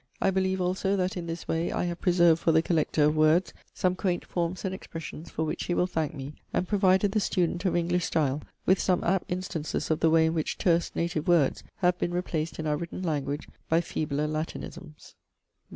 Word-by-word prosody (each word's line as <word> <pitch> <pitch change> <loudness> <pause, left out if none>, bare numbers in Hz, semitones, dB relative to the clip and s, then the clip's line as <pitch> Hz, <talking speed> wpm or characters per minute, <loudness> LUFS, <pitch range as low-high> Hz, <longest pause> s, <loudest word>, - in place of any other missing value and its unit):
I 195 - +2
believe 190 0 0
also 185 +2 0
that 185 -1 0
in 175 -2 -5
this 165 0 -5
way 165 +1 0
I - - -1
have 175 0 -3
preserved 175 -3 +4
for 165 - +3
the 160 0 +4
collector 155 -3 +1
of 150 +1 +3
words 155 +4 +3 0.2
some 185 0 +1
quaint 180 -2 -1
forms 175 +2 -2
and 190 - -1
expressions 165 -2 -8
for 160 - -2
which 155 - -3
he 175 - -1
will - - +3
thank 160 -5 -2
me, 135 +1 -6 0.2
and 180 - 0
provided 195 0 +3
the 215 - +2
student 180 -2 0
of 185 - +2
English 175 0 +1
style 150 -3 0 0.2
with 190 +1 +4
some 180 -2 +1
apt 190 0 0
instances 180 -4 -3
of 155 - +1
the 165 - +4
way 160 0 +5
in 160 - +1
which 160 -2 -2
terse 170 -2 +2
native 170 -1 -1
words 170 -6 +3 0.2
have 180 -1 +3
been 175 - -1
replaced 165 -3 -2
in 160 - -4
our 150 -1 +1
written 170 +3 -6
language 145 -3 -2 0.2
by 165 - +4
feebler 150 -3 -2
Latinisms. 155 +1 -6
170 Hz, 210 wpm, -28 LUFS, 155-180 Hz, 0.2 s, way